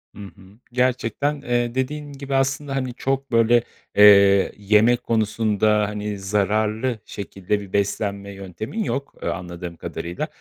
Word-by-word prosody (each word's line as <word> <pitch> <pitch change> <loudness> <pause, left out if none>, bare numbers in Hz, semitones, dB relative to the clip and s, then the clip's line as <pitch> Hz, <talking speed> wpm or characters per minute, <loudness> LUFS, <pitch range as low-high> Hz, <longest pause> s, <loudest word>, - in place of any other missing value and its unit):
Hı - - -12
hı. 100 0 -13 0.3
Gerçekten, 130 +3 0
eee, 120 -2 -1
dediğin 145 +3 -3
gibi 140 0 -4
aslında, 135 +1 0
hani, 130 -2 -2
çok, 135 +2 -2
böyle, 115 0 +4 0.3
eee, 100 -1 +7
yemek 105 +4 +3
konusunda, 110 -1 +1
hani, 105 -1 -4
zararlı 105 +4 0
şekilde 100 0 -3
bir 100 -2 -11
beslenme 100 0 -1
yöntemin 100 - -5
yok, 140 - -4
eee, - - -4
anladığım 85 -1 -6
kadarıyla. 85 +1 -5
110 Hz, 135 wpm, -22 LUFS, 100-130 Hz, 0.3 s, eee